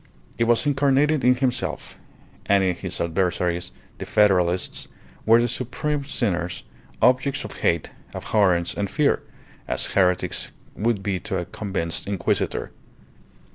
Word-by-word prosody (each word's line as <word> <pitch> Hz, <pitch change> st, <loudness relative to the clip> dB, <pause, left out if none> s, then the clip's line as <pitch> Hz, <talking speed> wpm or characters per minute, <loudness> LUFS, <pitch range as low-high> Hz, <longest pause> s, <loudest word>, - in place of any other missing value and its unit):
It 115 Hz, -, +3 dB
was 120 Hz, +3 st, +3 dB
incarnated 145 Hz, +1 st, +2 dB
in 125 Hz, +1 st, +5 dB
himself, 125 Hz, -1 st, -2 dB, 0.5 s
and 100 Hz, -1 st, +4 dB
his 90 Hz, 0 st, -2 dB
adversaries, 85 Hz, 0 st, -1 dB, 0.3 s
the -, -, -5 dB
Federalists, 95 Hz, -4 st, +2 dB, 0.4 s
were 115 Hz, +1 st, +7 dB
the 120 Hz, -, +2 dB
supreme 140 Hz, +4 st, -2 dB
sinners, 90 Hz, -10 st, -2 dB, 0.4 s
objects 130 Hz, +2 st, +3 dB
of 105 Hz, -, -7 dB
hate, 85 Hz, -2 st, +1 dB, 0.2 s
abhorrence, 90 Hz, -5 st, +2 dB
and 100 Hz, -1 st, -2 dB
fear, 145 Hz, +7 st, +2 dB, 0.5 s
as -, -, 0 dB
heretics 90 Hz, -2 st, +1 dB, 0.3 s
would 110 Hz, -2 st, 0 dB
be 95 Hz, -2 st, -1 dB
to -, -, -3 dB
a -, -, -3 dB
convinced 95 Hz, -6 st, -4 dB
Inquisitor. 100 Hz, -2 st, -1 dB
100 Hz, 125 wpm, -23 LUFS, 90-125 Hz, 0.5 s, were